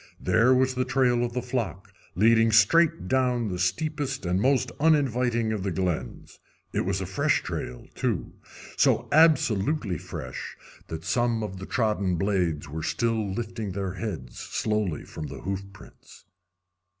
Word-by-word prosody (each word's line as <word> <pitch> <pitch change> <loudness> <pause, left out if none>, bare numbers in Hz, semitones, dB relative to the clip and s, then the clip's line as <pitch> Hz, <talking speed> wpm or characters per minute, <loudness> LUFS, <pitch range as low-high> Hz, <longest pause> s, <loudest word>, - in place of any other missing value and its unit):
There 115 +8 +3
was 130 0 +3
the 130 0 0
trail 125 -2 +2
of 120 -1 -2
the 125 -1 -2
flock 110 -6 -4 0.2
leading 115 +3 +4
straight 110 - +4
down 125 -2 +1
the 90 -1 -4
steepest 135 - -1
and 90 +2 +1
most 130 0 +2
uninviting 125 -7 +2
of 105 - -3
the 95 - -1
glens. 85 -8 -3 0.3
It - - 0
was 95 0 0
a - - -2
fresh 95 +1 +1
trail, 60 -1 -5
too - - -2 0.4
so - - +3
absolutely 130 - +3
fresh - - -7 0.3
that 80 0 -6
some 120 -2 +1
of 95 -3 -5
the 95 - -7
trodden 105 -6 0
blades 85 -5 0
were 80 +3 -5
still 110 +5 -1
lifting 110 -1 -4
their 95 -1 -3
heads 90 - -6
slowly 105 -7 -2
from 80 -2 -7
the 70 -1 -8
hoof 95 +1 -3
prints. 105 - -16
110 Hz, 150 wpm, -26 LUFS, 95-125 Hz, 0.4 s, leading